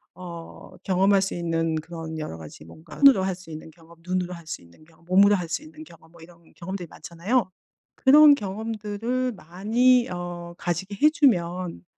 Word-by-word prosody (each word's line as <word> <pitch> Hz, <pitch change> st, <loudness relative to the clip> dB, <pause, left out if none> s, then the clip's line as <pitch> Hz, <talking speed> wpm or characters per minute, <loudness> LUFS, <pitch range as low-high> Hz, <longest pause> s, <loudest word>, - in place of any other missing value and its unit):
어 170 Hz, -2 st, -11 dB
경험할 195 Hz, +1 st, +3 dB
수 195 Hz, -, -3 dB
있는 165 Hz, -1 st, -1 dB
그런 160 Hz, 0 st, -7 dB
여러 155 Hz, -, -6 dB
가지 80 Hz, -2 st, -12 dB
뭔가 155 Hz, -, -14 dB
손으로 275 Hz, -9 st, +7 dB
할 190 Hz, 0 st, -1 dB
수 180 Hz, -2 st, -15 dB
있는 155 Hz, 0 st, -9 dB
경험, 165 Hz, +1 st, -19 dB
눈으로 180 Hz, 0 st, -2 dB
할 170 Hz, -2 st, -11 dB
수 160 Hz, -, -6 dB
있는 85 Hz, -, -20 dB
경험, 165 Hz, +1 st, -24 dB
몸으로 195 Hz, +3 st, +5 dB
할 175 Hz, -4 st, -4 dB
수 170 Hz, -, -3 dB
있는 310 Hz, 0 st, -12 dB
경험 165 Hz, -, -18 dB
뭐 170 Hz, -1 st, -18 dB
이런 170 Hz, 0 st, -18 dB
경험들이 190 Hz, +1 st, -6 dB
많잖아요. 185 Hz, +10 st, -2 dB, 0.5 s
'그런 290 Hz, +2 st, +7 dB
경험들을 220 Hz, +3 st, -3 dB
많이 230 Hz, +7 st, +2 dB
어 175 Hz, -1 st, -6 dB
가지게 180 Hz, +3 st, -3 dB
해 300 Hz, -, +7 dB
주면 180 Hz, -, 0 dB
180 Hz, 340 characters per minute, -24 LUFS, 165-210 Hz, 0.5 s, 손으로